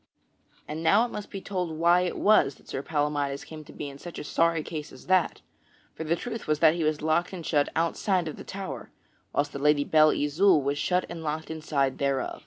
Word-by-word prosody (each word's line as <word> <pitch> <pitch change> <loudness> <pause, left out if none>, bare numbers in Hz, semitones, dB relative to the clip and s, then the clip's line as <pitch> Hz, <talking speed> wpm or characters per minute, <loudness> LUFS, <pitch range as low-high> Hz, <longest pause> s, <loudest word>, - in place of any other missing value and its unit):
And 155 +2 -5
now 200 +8 +4
it 245 - -7
must 210 - -6
be 195 - -6
told 180 -5 -3
why 170 +2 +4
it 180 - -2
was 200 -10 +4
that - - -23
Sir 135 - -4
Palamydes 145 -2 -1
came 155 -1 -9
to - - -13
be 145 - -6
in 140 0 -10
such 175 +2 -9
a - - -5
sorry 165 +1 +1
case 150 -2 -6
as 130 - -14
that; 185 -2 +2 0.5
for - - -6
the 160 +2 +1
truth 230 +4 -6
was 155 0 +2
that 155 0 +5
he 170 -1 -2
was 155 -1 0
locked 160 +4 +1
and 170 -4 -6
shut 145 -2 +2
outside 170 +2 0
of 155 - -5
the - - -9
tower, 190 -10 -6 0.4
whilst 145 0 -1
the 140 - -5
Lady 150 0 +3
Belle 155 +1 +5
Isoult 155 +2 +3
was 140 +1 -1
shut 180 +3 +1
and 170 -1 -7
locked 160 +1 -4
inside 145 -4 -1
thereof. 140 -2 -1
155 Hz, 225 wpm, -27 LUFS, 145-175 Hz, 0.5 s, that